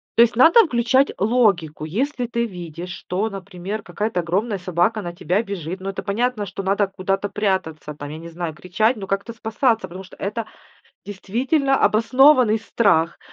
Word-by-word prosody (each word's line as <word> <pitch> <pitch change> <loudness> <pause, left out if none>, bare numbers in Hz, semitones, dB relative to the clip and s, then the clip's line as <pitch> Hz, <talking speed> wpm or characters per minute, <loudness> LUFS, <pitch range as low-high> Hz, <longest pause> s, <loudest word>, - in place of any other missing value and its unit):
то 230 - +6
есть 235 0 +1
надо 330 - +7
включать 260 +1 +2
логику. 195 -9 +1
Если 250 - -2
ты 235 0 -1
видишь, 175 -4 -8
что, 195 +5 -3
например, 195 +1 -6
какая-то 210 -3 -2
огромная 195 +6 -1
собака 180 +4 0
на 175 -2 -6
тебя 180 +4 0
бежит, 185 -3 -5
ну, 190 +1 -5
это 195 - -5
понятно, 220 +1 -1
что 195 - -6
надо 195 +1 +1
куда-то 195 +1 -2
прятаться, 190 -7 -2
там 145 0 -8
я 155 - -7
не 165 +1 -9
знаю, 170 -1 -5
кричать, 215 +9 0
но 195 -2 -7
как-то 195 +4 -2
спасаться. 225 +1 0
Потому 185 +3 -9
что 185 - -15
это 215 +3 -3 0.6
действительно 255 +8 0
обоснованный 250 0 +4
страх. 200 -7 +1
200 Hz, 165 wpm, -21 LUFS, 180-230 Hz, 0.6 s, надо